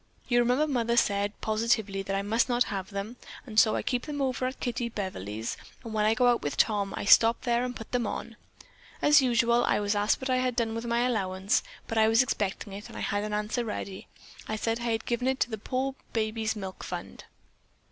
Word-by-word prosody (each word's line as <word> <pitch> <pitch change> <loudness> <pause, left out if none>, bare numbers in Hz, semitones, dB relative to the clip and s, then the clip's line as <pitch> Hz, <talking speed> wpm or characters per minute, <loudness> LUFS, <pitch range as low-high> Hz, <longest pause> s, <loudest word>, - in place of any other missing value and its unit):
You 240 -1 +3
remember 250 +5 +3
Mother 235 -5 0
said 205 -2 +1
positively 220 -3 0
that 195 0 -3
I 195 - -1
must 225 +5 +1
not 245 0 +3
have 190 -1 -4
them, 205 +4 -5 0.3
and 220 -4 +2
so 215 - +5
I - - -1
keep 250 +2 -1
them 290 -1 -4
over 260 -1 0
at 260 - -6
Kittie 240 -1 -2
Beverly's, 110 - -4 0.3
and 225 - -7
when 210 -1 +1
I 220 +1 +3
go 250 +1 +3
out 245 -1 +4
with 145 - -3
Tom, 205 -3 +2
I - - -3
stop 225 +3 +6
there 240 -1 +1
and 250 0 -3
put 225 - -9
them 245 -3 0
on. 230 - -5 0.6
As 295 -1 +6
usual, 235 -1 +3
I - - +2
was 205 0 0
asked 205 0 +2
what 260 0 -2
I 255 - +3
had 255 -1 0
done 230 -2 0
with 230 +1 -4
my 235 0 +1
allowance, 195 -5 +1 0.3
but 225 - 0
I 220 - +5
was 225 +3 +5
expecting 205 -4 -3
it 205 +1 -8
and - - -9
had 205 0 -1
an 210 - -4
answer 210 +3 -1
ready. 200 -3 -5 0.4
I 215 - -2
said 225 +1 -1
that 235 - -3
I - - +1
had 225 0 -1
given 240 +1 -1
it 265 0 +1
to 245 - +1
the 220 - -4
poor 265 +4 -2 0.2
babies' 220 0 -1
milk 190 -3 -7
fund." - - -7
225 Hz, 230 wpm, -28 LUFS, 205-245 Hz, 0.6 s, stop